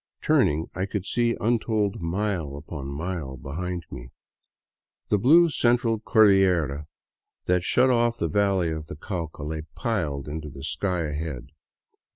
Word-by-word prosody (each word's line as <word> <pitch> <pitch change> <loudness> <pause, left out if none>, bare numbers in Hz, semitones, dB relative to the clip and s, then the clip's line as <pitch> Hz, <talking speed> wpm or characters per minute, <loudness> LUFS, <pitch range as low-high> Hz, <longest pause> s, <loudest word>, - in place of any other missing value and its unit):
Turning, 80 +3 +2
I 95 +1 -2
could 100 -2 -3
see 120 +1 +1
untold 110 -3 0
mile 85 -4 -2
upon 75 -2 -7
mile 75 -2 -4
behind 85 +7 -5
me. - - -8 1.0
The 105 - +3
blue 165 - +6
Central 120 -3 +2
Cordillera 95 - +3 0.6
that 90 -1 +2
shut 130 +7 +3
off 120 -1 +2
the 85 - 0
valley 95 -1 +1
of 80 -1 -5
the - - -7
Cauca 80 -3 -5
lay 80 +1 -3
piled 80 - -2
into 75 0 -5
the 70 -1 -10
sky 90 +1 -1
ahead. 75 -4 -4
90 Hz, 140 wpm, -25 LUFS, 75-105 Hz, 1.0 s, blue